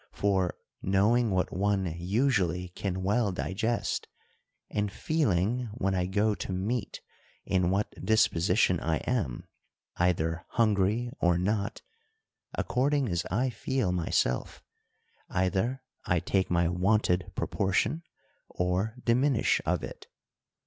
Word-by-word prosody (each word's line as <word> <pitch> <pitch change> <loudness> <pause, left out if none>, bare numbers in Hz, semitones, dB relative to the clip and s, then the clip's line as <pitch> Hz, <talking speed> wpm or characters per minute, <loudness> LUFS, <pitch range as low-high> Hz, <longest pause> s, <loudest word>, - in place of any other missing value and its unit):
For, 95 -3 +1 0.2
knowing 110 +5 +3
what 95 -2 0
one 100 +1 +1
usually 90 -2 +1
can 95 +1 -3
well 105 +2 +2
digest, 110 +6 -2 0.6
and 105 -1 -1
feeling 120 - 0
when 95 -5 0
I 90 -1 0
go 105 +3 +2
to 100 - -5
meat 100 +5 -2 0.4
in 90 -2 +2
what 100 +3 -2
disposition 90 -3 +3
I 80 -1 0
am, 100 - -2 0.5
either 85 -1 +1
hungry 110 +1 +2
or 90 -1 +3
not; 100 +4 -1 0.7
according 135 0 +1
as 85 -2 -1
I 125 +7 +1
feel 120 -5 -1
myself, 80 -7 -1 0.7
either 95 +8 0 0.2
I 90 - +2
take 95 +3 0
my 85 -1 +2
wonted 90 0 +1
proportion, 100 - 0 0.5
or 90 +5 -1
diminish 125 +1 +3
of - - +1
it. - - -8
100 Hz, 115 wpm, -29 LUFS, 90-115 Hz, 0.7 s, knowing